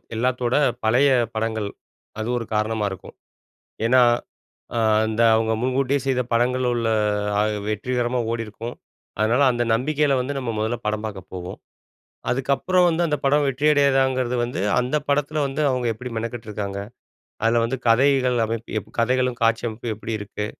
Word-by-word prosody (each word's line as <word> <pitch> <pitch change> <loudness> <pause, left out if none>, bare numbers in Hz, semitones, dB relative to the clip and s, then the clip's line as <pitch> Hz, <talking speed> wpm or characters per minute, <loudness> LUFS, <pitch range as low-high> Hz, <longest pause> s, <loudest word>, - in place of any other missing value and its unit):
எல்லாத்தோட 125 +1 0 0.3
பழைய 120 +6 +4 0.3
படங்கள், 110 -2 -2 0.5
அது 110 +2 -3
ஒரு 115 - -4
காரணமா 105 0 0
இருக்கும். 95 - -10 0.7
ஏன்னா, 125 +2 +5 0.8
அ - - +2 0.3
அந்த 110 +1 -1
அவங்க 110 0 +1
முன்கூட்டியே 130 +2 +1
செய்த 130 -1 +2
படங்கள்ல 125 +1 +2
உள்ள 115 -1 -1 0.5
அ - - +4 0.3
வெற்றிகரமா 120 +3 -1
ஓடியிருக்கும். 115 +1 -5 0.4
அதனால 115 +5 +2
அந்த 120 0 0
நம்பிக்கையில 145 +3 +1
வந்து 135 +3 -3
நம்ம 125 -3 -3
மொதல்ல 110 +3 -1
படம் 105 0 -1
பாக்க 105 -3 -5
போவோம். 90 0 -7 0.7
அதுக்கப்புறம் 140 +8 +2
வந்து, 170 0 +1
அந்த 150 - +1
படம் 145 +2 +3
வெற்றியடையிதாங்கிறது 135 -3 +2
வந்து, 120 -5 -4 0.2
அந்த 125 +4 -1
படத்துல 145 +1 +1
வந்து 135 +2 -4
அவுங்க 125 -2 -1
எப்படி 125 +3 -7
மெனக்கெட்டுருக்காங்க? 105 -4 -5 0.7
அதுல 115 +1 +3
வந்து 120 +3 -1
கதைகள் 130 +1 +4
அமைப்பு 115 +1 -5
எப் 105 - -15
கதைகளும் 125 +1 +1
காட்சி 115 0 +2
அமைப்பும் 115 0 -4
எப்படி 110 +2 -7
இருக்கு? 105 0 -5
120 Hz, 145 wpm, -23 LUFS, 110-130 Hz, 0.8 s, ஏன்னா